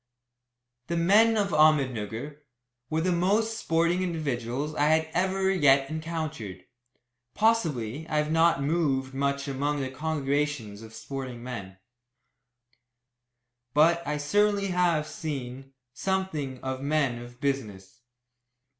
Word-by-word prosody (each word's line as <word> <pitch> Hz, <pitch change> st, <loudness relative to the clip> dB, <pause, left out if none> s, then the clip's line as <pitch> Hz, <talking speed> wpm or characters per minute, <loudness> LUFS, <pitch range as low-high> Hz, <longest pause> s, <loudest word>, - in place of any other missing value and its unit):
The 170 Hz, -, -1 dB
men 215 Hz, +6 st, +5 dB
of 200 Hz, -2 st, +1 dB
Ahmednugger 140 Hz, -, +1 dB, 0.5 s
were 160 Hz, +1 st, 0 dB
the 185 Hz, +2 st, +1 dB
most 205 Hz, +6 st, +1 dB
sporting 170 Hz, +2 st, +1 dB
individuals 145 Hz, -5 st, -2 dB
I 145 Hz, -1 st, +1 dB
had 160 Hz, +1 st, +2 dB
ever 190 Hz, +2 st, +1 dB
yet 140 Hz, -6 st, +4 dB
encountered. 155 Hz, -, -5 dB, 0.7 s
Possibly 160 Hz, -, +1 dB
I 155 Hz, -, 0 dB
have 150 Hz, 0 st, +1 dB
not 165 Hz, -3 st, +3 dB
moved 140 Hz, -4 st, 0 dB
much 140 Hz, +1 st, -1 dB
among 145 Hz, +2 st, -1 dB
the 130 Hz, -1 st, -3 dB
congregations 140 Hz, -6 st, -2 dB
of 110 Hz, -, -10 dB
the 110 Hz, -, -15 dB
sporting 130 Hz, 0 st, -6 dB
men, 100 Hz, -7 st, -7 dB, 2.0 s
but 165 Hz, +3 st, +5 dB
I 150 Hz, 0 st, -1 dB
certainly 200 Hz, +6 st, +1 dB
have 175 Hz, -4 st, +2 dB
seen 135 Hz, -3 st, -6 dB, 0.2 s
something 155 Hz, -7 st, -2 dB
of 130 Hz, 0 st, -3 dB
men 140 Hz, -4 st, 0 dB
of 120 Hz, 0 st, -12 dB
business. 115 Hz, -8 st, -3 dB
150 Hz, 120 wpm, -27 LUFS, 130-170 Hz, 2.0 s, men